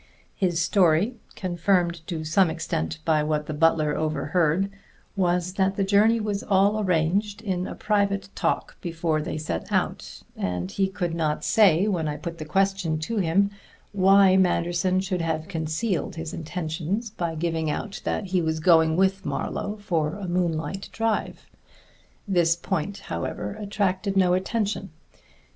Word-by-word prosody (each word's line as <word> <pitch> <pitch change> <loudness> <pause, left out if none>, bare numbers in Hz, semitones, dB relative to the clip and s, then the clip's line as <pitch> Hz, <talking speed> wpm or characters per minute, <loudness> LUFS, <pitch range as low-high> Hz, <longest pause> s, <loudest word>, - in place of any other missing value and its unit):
_ - - -30 0.3
His 175 -4 0
story 180 +5 +3 0.2
confirmed 175 -2 0
to 165 -3 -3
some 165 +3 +3
extent 80 - -3
by 155 -2 +3
what 150 0 -1
the 155 - -4
butler 155 -1 +2
overheard 160 +4 0 0.4
was 180 -1 +1
that 195 0 +1
the 195 - 0
journey 210 +4 +4
was 210 -2 -2
all 200 +2 +2
arranged 195 +3 +1
in 185 -3 -2
a - - -6
private 200 -2 0
talk - - -2
before 165 -2 -1
they 155 - -4
set 150 - -4
out, - - -2
and 90 +1 -3
he 195 - +1
could 180 -3 -3
not 155 -2 -1
say, 200 -4 +4
when 175 -6 0
I 150 0 -3
put 170 -1 -6
the 155 - -5
question 190 -1 +1
to 160 +9 -3
him, 200 +2 +2 0.4
why 195 -1 +5
Manderson 180 0 +2
should 185 -2 -2
have 160 -1 -2
concealed 165 +3 -2
his 165 -1 -6
intentions 170 +6 -3
by 170 -6 -3
giving 160 -1 -1
out 195 +6 -4
that 210 - -2
he 185 -1 0
was 160 -1 -1
going 160 -1 +4
with 190 +1 +2
Marlowe 205 - -3
for 165 -7 -1
a 200 -2 -6
moonlight 175 +1 -2
drive. 225 -1 -2 0.8
This 170 -4 +3
point, 190 +2 -3
however, - - -4
attracted 200 -1 -1
no 180 -2 +4
attention. 200 +1 -1
180 Hz, 155 wpm, -25 LUFS, 160-195 Hz, 0.8 s, why